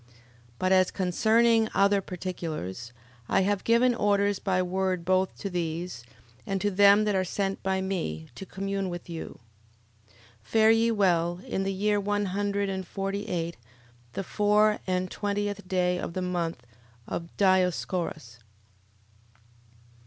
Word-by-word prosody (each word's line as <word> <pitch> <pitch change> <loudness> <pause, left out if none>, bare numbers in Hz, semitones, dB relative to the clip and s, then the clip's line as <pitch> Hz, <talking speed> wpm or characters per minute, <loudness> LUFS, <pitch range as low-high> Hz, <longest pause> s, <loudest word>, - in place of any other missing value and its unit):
11:20. 120 - -25 0.4
But 185 0 0
as 185 -1 +5
concerning 220 +4 +3
other 200 0 +4
particulars, 160 - -5 0.4
I - - +3
have 200 0 0
given 240 +2 +4
orders 205 -3 +1
by 185 -2 0
word 185 -1 -1
both 185 +1 +1
to - - -4
these, 170 -6 -4 0.4
and 195 -1 -2
to 205 +1 0
them 200 +2 +6
that 210 -1 +1
are 190 -1 +2
sent 195 +1 -2
by 190 0 0
me, 120 - -3
to 195 - -8
commune 195 0 -3
with 175 0 -7
you. 165 - -7 0.7
11:21. 105 -2 -27 0.2
Fare 220 - +4
ye 225 +1 +3
well. 175 -5 +2
In 190 - -2
the 195 0 -1
year 205 +2 +1
one 205 +1 0
hundred 200 +1 -1
and 190 -2 -4
forty 195 +2 -3
eight, 170 -3 -3 0.6
the 195 - -3
four 210 +2 +2
and 185 0 -1
twentieth 205 -1 -3
day 180 -1 +1
of 170 - -5
the 185 - -2
month 170 -8 -3 0.4
of 170 0 -4
Dioscorus. 180 - 0
190 Hz, 145 wpm, -27 LUFS, 180-205 Hz, 0.7 s, them